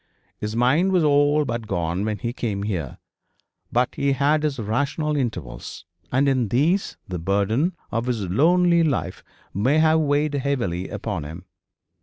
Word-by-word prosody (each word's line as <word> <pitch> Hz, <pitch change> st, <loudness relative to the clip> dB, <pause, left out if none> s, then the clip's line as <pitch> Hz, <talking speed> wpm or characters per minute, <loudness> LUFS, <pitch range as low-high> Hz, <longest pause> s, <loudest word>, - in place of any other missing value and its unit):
His 105 Hz, +1 st, -4 dB
mind 145 Hz, +11 st, +3 dB
was 180 Hz, -3 st, +3 dB
all 145 Hz, 0 st, +3 dB
but 115 Hz, -3 st, -4 dB
gone 85 Hz, 0 st, -1 dB
when 110 Hz, -1 st, -2 dB
he 120 Hz, +5 st, -4 dB
came 105 Hz, -6 st, -3 dB
here, 90 Hz, -10 st, -3 dB, 0.7 s
but 125 Hz, +1 st, +1 dB
he 140 Hz, 0 st, +1 dB
had 145 Hz, +3 st, +2 dB
his 150 Hz, -2 st, -1 dB
rational 140 Hz, +7 st, -1 dB
intervals, 110 Hz, -, -4 dB, 0.3 s
and 135 Hz, +3 st, +2 dB
in 130 Hz, -4 st, +2 dB
these 155 Hz, -, +1 dB
the 90 Hz, -2 st, -4 dB
burden 100 Hz, -, 0 dB, 0.2 s
of 115 Hz, +2 st, -2 dB
his 115 Hz, -5 st, -1 dB
lonely 170 Hz, -, +4 dB
life 130 Hz, -, -1 dB, 0.3 s
may 125 Hz, -, +2 dB
have 160 Hz, 0 st, +4 dB
weighed 145 Hz, 0 st, +1 dB
heavily 125 Hz, -11 st, -1 dB
upon 105 Hz, -5 st, -4 dB
him. 80 Hz, +5 st, -9 dB
125 Hz, 155 wpm, -23 LUFS, 100-150 Hz, 0.7 s, lonely